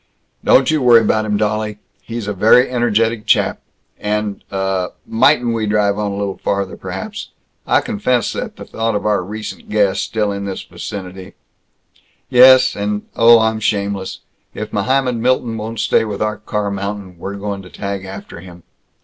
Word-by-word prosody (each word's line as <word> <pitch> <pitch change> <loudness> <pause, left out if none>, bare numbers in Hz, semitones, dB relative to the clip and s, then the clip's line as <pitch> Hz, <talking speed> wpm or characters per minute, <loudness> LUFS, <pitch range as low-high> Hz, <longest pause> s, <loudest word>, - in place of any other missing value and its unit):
"Don't 130 +3 +4
you 155 -2 +1
worry 120 -2 +7
about 110 0 +1
him, 105 -1 0
dolly. 105 0 -1 0.2
He's 115 -2 -6
a 105 - -1
very 110 +6 +5
energetic 115 -2 0
chap. - - +2 0.4
And 105 -1 -2
Uh 95 -2 -1 0.2
Mightn't 120 0 +3
we 110 -2 -1
drive 105 -1 +1
on 105 -1 -1
a - - -4
little 100 -1 -3
farther, 100 -1 -2
perhaps? 215 -1 -6 0.4
I - - +3
confess 165 - 0
that - - -5
the - - -10
thought 115 -1 -2
of 105 - -2
our 105 -3 +1
recent 105 +3 -7
guest 105 -2 +2
still 105 -2 -1
in 100 0 -4
this 95 -1 -5
vicinity 95 -1 -8 0.5
" - - -37
"Yes, 130 0 +8
and 105 0 -2
Oh, 115 0 +7
I'm 110 0 +1
shameless. 100 -2 -2 0.3
If 105 0 -6
Mohammed 125 +4 +1
Milton 120 -1 0
won't 110 0 -5
stay - - +2
with 105 -3 -4
our 105 0 -1
car 105 -1 -3
mountain, 100 -2 -5
we're 100 +3 -5
going 100 0 -4
to 95 - -13
tag 100 0 -5
after 95 -2 -9
him." 90 -1 -13
105 Hz, 175 wpm, -18 LUFS, 100-115 Hz, 0.5 s, Yes